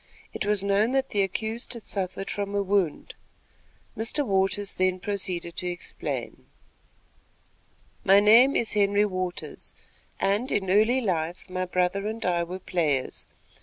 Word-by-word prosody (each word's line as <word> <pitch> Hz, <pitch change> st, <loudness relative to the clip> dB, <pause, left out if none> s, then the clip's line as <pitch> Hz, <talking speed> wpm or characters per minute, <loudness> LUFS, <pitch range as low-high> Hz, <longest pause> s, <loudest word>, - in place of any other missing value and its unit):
It -, -, -3 dB
was 205 Hz, -2 st, +2 dB
known 200 Hz, +5 st, +2 dB
that 270 Hz, 0 st, +1 dB
the 205 Hz, -, +1 dB
accused 220 Hz, +5 st, -3 dB
had 230 Hz, -, -9 dB
suffered 195 Hz, 0 st, -4 dB
from 205 Hz, 0 st, -3 dB
a 200 Hz, -, +1 dB
wound. 190 Hz, -5 st, 0 dB, 0.8 s
Mr. 230 Hz, +6 st, 0 dB
Waters 195 Hz, 0 st, +1 dB
then 185 Hz, 0 st, +1 dB
proceeded 180 Hz, -4 st, -3 dB
to 180 Hz, -, -2 dB
explain: 175 Hz, 0 st, -5 dB, 1.6 s
"My 195 Hz, +1 st, +6 dB
name 230 Hz, +6 st, +6 dB
is 225 Hz, -, +1 dB
Henry 205 Hz, 0 st, +3 dB
Waters, 185 Hz, -3 st, -5 dB, 0.4 s
and, 205 Hz, +7 st, 0 dB
in 190 Hz, -2 st, 0 dB
early 220 Hz, +6 st, +4 dB
life, 175 Hz, -3 st, -2 dB
my 185 Hz, 0 st, -1 dB
brother 180 Hz, +3 st, 0 dB
and 220 Hz, +1 st, -4 dB
I 175 Hz, -1 st, +1 dB
were 180 Hz, +2 st, -5 dB
players. 155 Hz, -8 st, -1 dB
195 Hz, 140 wpm, -26 LUFS, 185-210 Hz, 1.6 s, My